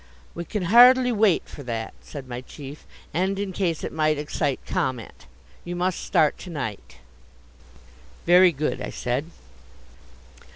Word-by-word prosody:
"We 170 - -6
can 205 +3 -3
hardly 250 +6 +7
wait 210 -5 +3
for - - -10
that," 115 -4 -4
said 140 -3 -9
my 125 0 -6
chief, 140 +2 -11 0.3
"and 190 +4 0
in 200 -1 -3
case 170 -4 -1
it - - -4
might 155 -1 +1
excite 145 -1 -2
comment. 120 - -3 0.4
You 175 0 -5
must 180 0 -1
start 155 - +2
to 185 - -9
night!" 110 - -6 1.3
"Very 180 +1 +7
good," 150 0 -2
I - - -4
said. 130 +6 -3
160 Hz, 140 wpm, -24 LUFS, 140-185 Hz, 1.3 s, hardly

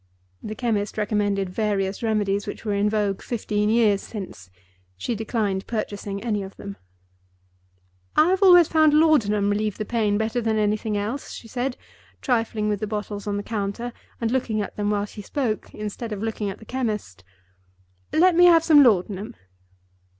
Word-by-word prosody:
The 215 - -6
chemist 215 -5 -1
recommended 205 -2 0
various 195 -1 -1
remedies 205 -3 0
which 205 - -7
were 210 - 0
in 200 +1 +2
vogue 205 -2 -1
fifteen 210 -3 -1
years 220 -3 +3
since. 110 - -8 0.5
She 165 - -2
declined 210 -3 -2
purchasing 205 -2 -4
any 215 -4 -1
of 195 0 -9
them. 200 0 -8 1.4
"I 310 +3 +5
have 380 +1 +1
always 355 -4 +8
found 310 -2 +4
Laudanum 210 -11 +3
relieve 210 0 -1
the 215 - -3
pain 210 -2 +1
better 220 +3 -1
than 220 -1 0
anything 210 0 0
else," 220 +7 -4
she 230 - -9
said, 245 +3 -3 0.4
trifling 225 -4 0
with 210 -1 0
the 215 - -3
bottles 210 -1 -5
on 205 0 -1
the 205 - -3
counter, 220 +3 -3 0.3
and 230 -1 -1
looking 240 -4 0
at 205 - -4
them 205 0 -1
while 205 -1 0
she 210 0 -10
spoke, 230 -1 -3
instead 215 +2 -6
of 210 0 -4
looking 220 -2 -2
at 195 - -6
the 220 - -14
chemist. 210 - -4 0.9
"Let 360 +1 +4
me 355 +1 +7
have 335 -2 +6
some 310 -3 +7
Laudanum." 210 -1 +2
215 Hz, 170 wpm, -24 LUFS, 205-235 Hz, 1.4 s, always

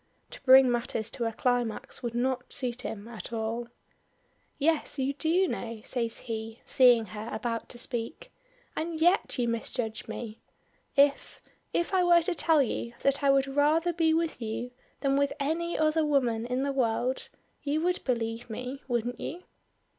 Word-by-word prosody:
To - - -10
bring 260 -1 +7
matters 230 -2 -1
to 240 -3 -2
a 225 - 0
climax, 245 -1 -1
would 235 -1 -4
not 250 +1 -1
suit 250 -1 -2
him 220 -3 -6
at 235 -1 -8
all. 230 +1 -2 0.9
"Yes, 310 0 +1
you 270 +1 0
do 335 +6 +2
know," 230 -7 -5
says 230 -3 -2
he, 225 0 -5
seeing 245 -4 +5
her 210 +3 -7
about 230 +1 -3
to 245 - -6
speak. 235 -1 -4 0.4
"And 320 0 -3
yet 350 +1 +3
you 245 -2 +1
misjudge 230 -1 -3
me. 225 -2 -6 0.6
If 280 0 +3 0.3
if 345 +3 -1
I 370 -1 +4
were 345 -1 +5
to 360 - 0
tell 320 -3 +4
you 235 -1 -3
that 275 +1 +2
I 280 - +4
would 275 0 +4
rather 300 +5 +2
be 325 -1 +2
with 325 -4 0
you 230 +2 -4 0.3
than 275 -1 +2
with 280 0 +2
any 330 +4 -1
other 310 +1 +2
woman 245 -6 +1
in 250 +2 -1
the 280 0 -1
world, 250 0 0 0.3
you 295 +2 0
would 360 +2 0
believe 230 -2 -2
me, 250 +5 -5
wouldn't 240 0 -1
you?" 355 +3 -6
255 Hz, 170 wpm, -29 LUFS, 230-300 Hz, 0.9 s, bring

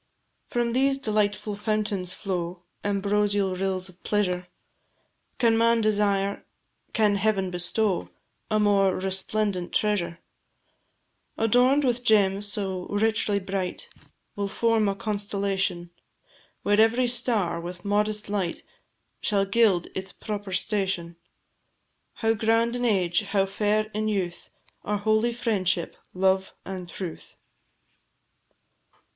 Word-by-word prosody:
From 240 -1 0
these 270 +2 +3
delightful 210 -3 0
fountains 205 -3 -1
flow 180 -2 -4 0.2
Ambrosial 200 -1 +1
rills 190 0 -2
of 185 -1 -15
pleasure; 180 -4 0 0.9
Can 230 -2 +4
man 230 +1 +4
desire, 200 -2 +1 0.5
can 210 -2 +3
Heaven 195 -2 +1
bestow, 180 +2 0 0.4
A 215 -1 +2
more 200 -2 +3
resplendent 190 0 -2
treasure? 200 -6 0 1.2
Adorn'd 250 +6 +4
with 245 -2 0
gems 205 -2 +3
so 190 -4 -3
richly 210 0 +1
bright, 190 -1 -3 0.5
Will 200 -1 -1
form 225 0 +2
a 195 - -1
constellation, 200 -4 -2 0.7
Where 205 +1 +4
every 235 +3 +3
star, 210 -9 +1
with 175 +2 -8
modest 210 +1 0
light, 200 -4 -2 0.6
Shall 200 -2 +2
gild 195 -4 +3
its 190 +1 -5
proper 205 -2 -6
station. 190 -3 -1 1.0
How 225 -1 +1
grand 225 +2 +2
in 245 0 -1
age, 185 -5 +2
how 200 -1 +1
fair 210 +2 +1
in 215 +1 -1
youth, 190 -5 -2 0.3
Are 210 0 -1
holy 215 +3 +2
"Friendship, 190 -7 -1 0.2
Love, 190 +1 +2
and 185 -2 -6
Truth!" 175 -3 -7
205 Hz, 110 wpm, -26 LUFS, 190-215 Hz, 1.2 s, Can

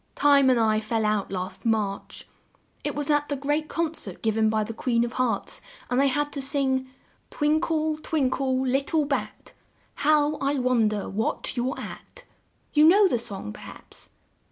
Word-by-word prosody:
"Time 280 -2 +5
and 250 -2 +4
I 215 -1 +3
fell 220 0 -1
out 210 -2 0
last 185 -1 -5
March. 215 -3 -2 0.6
It - - -2
was 290 0 -1
at 295 0 +1
the 285 - 0
great 290 +3 -1
con 330 -2 -1
cert 195 - -9
giv 220 -1 +1
en 220 -1 +3
by 215 0 +1
the 225 +2 -6
Queen 235 0 +1
of 240 0 -3
Hearts 255 -3 -1 0.3
and 250 +2 +3
I - - +4
had 290 +2 0
to 280 - -4
sing: 265 -1 0 0.4
'Twin 300 +1 +1
kle, 315 -1 0
twin 285 -6 0
kle, 265 -1 0
lit 270 +2 +1
tle 315 -3 +1
bat! 280 -1 -4 0.4
How 300 0 +3
I 280 +1 0
wonder 230 -5 +1
what 220 +6 -2
you're 250 +1 -1
at!' - - -10 0.5
You 300 0 +6
know 390 +5 +7
the 245 - 0
song, 195 - -6
per - - -12
haps?" - - -13
260 Hz, 185 wpm, -25 LUFS, 225-295 Hz, 0.6 s, know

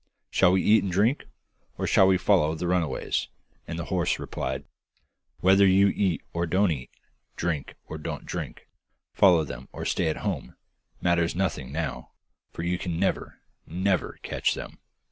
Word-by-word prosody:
Shall 90 - +4
we 95 - +2
eat 110 +1 +5
and 95 - -3
drink, 110 +10 +1 0.5
or - - -2
shall 95 - +5
we 95 -1 +4
follow 85 -4 +3
the 85 - -4
runaways?' 90 -3 0 0.4
and 80 - -4
the 85 - -4
horse 90 -1 +1
replied, 65 +1 -4 0.8
'Whether 95 +2 +6
you 95 +1 +5
eat 95 -6 0
or 85 0 -1
don't 95 +2 +3
eat, 65 -5 -4 0.5
drink 80 -5 -2
or 80 - -7
don't - - -5
drink, - - -6 0.5
follow 90 -5 +5
them - - -8
or - - -6
stay - - +1
at 80 - -1
home, - - -3 0.5
matters 85 -1 +2
nothing 80 -8 -2
now, 80 -1 -4 0.4
for 85 - -6
you 90 +1 -1
can 85 -2 -3
never, 95 - -1 0.3
never 95 +3 0
catch - - 0
them. - - -8
90 Hz, 165 wpm, -26 LUFS, 80-95 Hz, 0.8 s, Whether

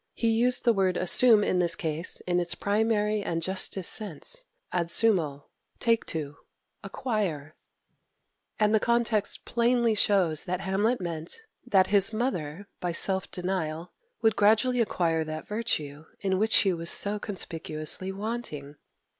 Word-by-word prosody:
He 230 - 0
used 245 +3 +2
the 235 - +4
word 190 -3 0
"assume" 215 +4 +6
in 185 - 0
this 170 -2 +3
case 160 +1 -2
in 180 0 0
its 175 -1 -3
primary 210 0 0
and 165 -4 -2
justest 190 +1 0
sense; 215 - -2 0.3
ad 170 -1 -1
sumo, 170 -8 +2 0.3
take 230 -1 0
to, 150 -3 -5 0.5
acquire; 195 - -3 1.1
and 210 0 +2
the 220 - +4
context 235 -2 +1
plainly 235 -1 +1
shows 190 -7 +1
that 180 0 -3
Hamlet 205 +5 0
meant 170 - -6 0.3
that 190 -5 +4
his 200 +1 +4
mother, 200 - -3
by 175 -2 -2
self 190 +2 +2
denial, 180 -2 -4 0.3
would 220 -1 +3
gradually 225 +5 +3
acquire 165 -7 0
that 155 0 -7
virtue 160 -10 -3
in 190 -2 -1
which 220 +1 0
she 195 -2 +4
was 170 0 -4
so 205 +1 +2
conspicuously 165 -2 -4
wanting. 195 -9 -6
195 Hz, 140 wpm, -27 LUFS, 165-220 Hz, 1.1 s, assume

